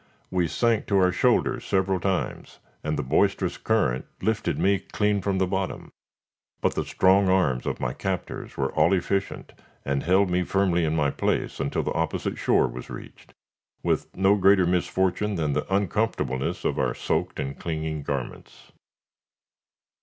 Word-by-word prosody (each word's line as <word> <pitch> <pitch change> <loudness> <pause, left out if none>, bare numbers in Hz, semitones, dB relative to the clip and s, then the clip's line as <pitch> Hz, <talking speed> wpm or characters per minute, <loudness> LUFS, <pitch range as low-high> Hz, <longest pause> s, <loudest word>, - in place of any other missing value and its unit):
We 90 -2 +1
sank 115 +7 +1
to 100 - +2
our 90 -1 +4
shoulders - - +1
several 95 -1 +1
times, 95 0 -3 0.3
and 75 0 -1
the 75 - -1
boisterous 90 +6 +1
current 95 - +1
lifted 110 -1 -1
me 100 0 +2
clean 105 +1 0
from 95 0 0
the 95 - +2
bottom, 95 0 -3 0.7
but - - +1
the - - -1
strong 95 +1 +3
arms 85 -10 +2
of - - -2
my 60 0 -2
captors 95 -3 -4
were 65 -1 0
all 80 +4 +3
efficient, 95 +1 -2 0.3
and 70 0 0
held 95 +2 +3
me 90 +1 +2
firmly 90 -3 +1
in 80 0 0
my 75 -3 +2
place - - -1
until 70 - -1
the - - -2
opposite 80 -1 -2
shore - - +3
was - - -8
reached, - - -11 0.5
with - - 0
no 95 +1 +4
greater 95 -1 +5
misfortune 95 +3 0
than 75 -4 0
the 70 - -3
uncomfortableness 100 - -1
of - - 0
our - - 0
soaked - - -2
and 70 0 -4
clinging 80 -2 -3
garments. 70 -3 -6
90 Hz, 160 wpm, -25 LUFS, 75-95 Hz, 0.7 s, greater